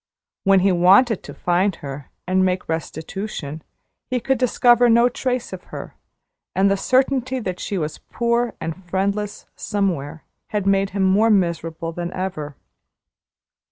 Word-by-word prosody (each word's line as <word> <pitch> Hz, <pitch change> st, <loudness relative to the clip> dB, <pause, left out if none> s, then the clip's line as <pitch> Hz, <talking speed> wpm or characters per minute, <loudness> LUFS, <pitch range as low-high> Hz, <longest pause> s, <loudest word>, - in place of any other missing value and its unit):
When 195 Hz, -1 st, +5 dB
he 195 Hz, +1 st, +4 dB
wanted 190 Hz, +6 st, +5 dB
to -, -, -10 dB
find 180 Hz, +2 st, +1 dB
her, 140 Hz, -2 st, -8 dB, 0.2 s
and 185 Hz, +1 st, +2 dB
make 185 Hz, 0 st, 0 dB
restitution, 160 Hz, 0 st, -5 dB, 0.5 s
he 255 Hz, -1 st, 0 dB
could 265 Hz, +1 st, 0 dB
discover 245 Hz, -1 st, +4 dB
no 235 Hz, +1 st, +5 dB
trace 250 Hz, 0 st, -2 dB
of -, -, -8 dB
her; -, -, -8 dB, 0.6 s
and 195 Hz, +1 st, +3 dB
the -, -, +3 dB
certainty 260 Hz, +3 st, +1 dB
that 185 Hz, -6 st, -4 dB
she 200 Hz, -, -3 dB
was 155 Hz, -3 st, -3 dB
poor 235 Hz, 0 st, -1 dB
and 165 Hz, +4 st, -5 dB
friendless 200 Hz, +3 st, -2 dB
somewhere 165 Hz, -7 st, -2 dB, 0.2 s
had 210 Hz, -2 st, -2 dB
made 195 Hz, 0 st, +2 dB
him 195 Hz, 0 st, -1 dB
more 200 Hz, +4 st, +4 dB
miserable 165 Hz, -4 st, 0 dB
than 175 Hz, +1 st, -4 dB
ever. 165 Hz, -6 st, -4 dB
195 Hz, 145 wpm, -21 LUFS, 175-225 Hz, 0.6 s, When